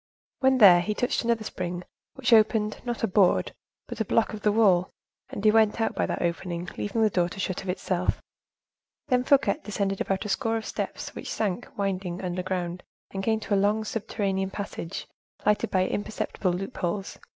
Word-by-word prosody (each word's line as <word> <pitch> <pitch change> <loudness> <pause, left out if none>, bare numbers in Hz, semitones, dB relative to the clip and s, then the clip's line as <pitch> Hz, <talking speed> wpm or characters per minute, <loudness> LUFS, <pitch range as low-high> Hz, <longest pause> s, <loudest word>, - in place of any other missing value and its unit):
When 265 0 +4
there, 185 -7 +8
he 210 +4 -2
touched 245 - 0
another 230 -1 +1
spring, 180 -3 -4 0.3
which 250 -3 +2
opened, 215 -1 +3
not 240 -2 -4
a - - +4
board, 190 -1 +3 0.3
but - - -7
a - - +2
block 220 +2 +1
of 215 - -6
the 210 - +3
wall, 190 -5 +4 0.4
and 205 - -6
he 215 - +7
went 220 0 +3
out 225 - +1
by - - 0
that - - -2
opening, 170 0 -2
leaving 220 +2 -1
the 215 - +4
door 175 -2 +1
to 195 - -9
shut 185 -1 -2
of 190 - -7
itself. 180 0 -1 0.9
Then 250 -1 +3
Fouquet 280 +2 +3
descended 200 -2 -2
about 195 +1 -1
a - - -4
score 225 +2 0
of 220 - -5
steps - - -4
which - - -6
sank, 215 +2 -2
winding, 190 -3 -2
underground, 180 -1 -3 0.3
and 195 - -3
came 220 +1 +1
to 205 - -2
a - - +5
long, 205 +2 +2
subterranean 195 -3 -2
passage, 195 -3 -5 0.4
lighted 210 0 +2
by 185 -1 +2
imperceptible 205 -2 -2
loopholes. 190 +1 -3
200 Hz, 185 wpm, -27 LUFS, 185-220 Hz, 0.9 s, there